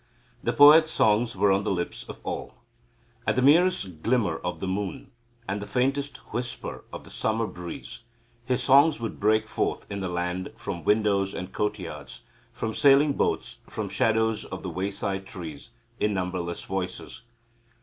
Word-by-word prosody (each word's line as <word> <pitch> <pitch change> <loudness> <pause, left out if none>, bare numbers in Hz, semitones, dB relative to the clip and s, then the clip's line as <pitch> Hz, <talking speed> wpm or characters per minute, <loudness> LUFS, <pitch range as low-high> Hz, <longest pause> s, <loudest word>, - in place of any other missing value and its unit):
The - - 0
poet's 155 +2 +8
songs 115 -2 +2
were 100 - +3
on 95 +1 +2
the 105 - -1
lips 90 -2 -3
of - - -8
all. - - -5 0.7
At - - +2
the 130 - +2
merest 145 - +3
glimmer 110 -8 +1
of 90 - -4
the 95 - -3
moon 95 -1 -3 0.4
and 100 +2 -2
the 105 - -6
faintest 135 +2 0 0.2
whisper 120 0 -4
of - - -8
the - - -14
summer 110 +1 0
breeze 90 -4 -8 0.4
his 125 0 0
songs 140 +3 +5
would 115 -2 -5
break 110 +1 +3
forth - - -2
in 100 - -3
the 95 -1 -3
land 90 +1 -3
from 85 -4 -6
windows 100 -1 +2
and 90 +1 -6
courtyards, 95 -10 -4 0.3
from 110 -1 -3
sailing 140 +3 +5
boats, - - -1
from - - -4
shadows 110 -1 +1
of 95 - -7
the 95 - -4
wayside 95 +2 -3
trees, 85 +1 -8 0.3
in 105 -1 +1
numberless 90 -2 -3
voices. 90 -1 -5
105 Hz, 160 wpm, -26 LUFS, 95-120 Hz, 0.7 s, poet's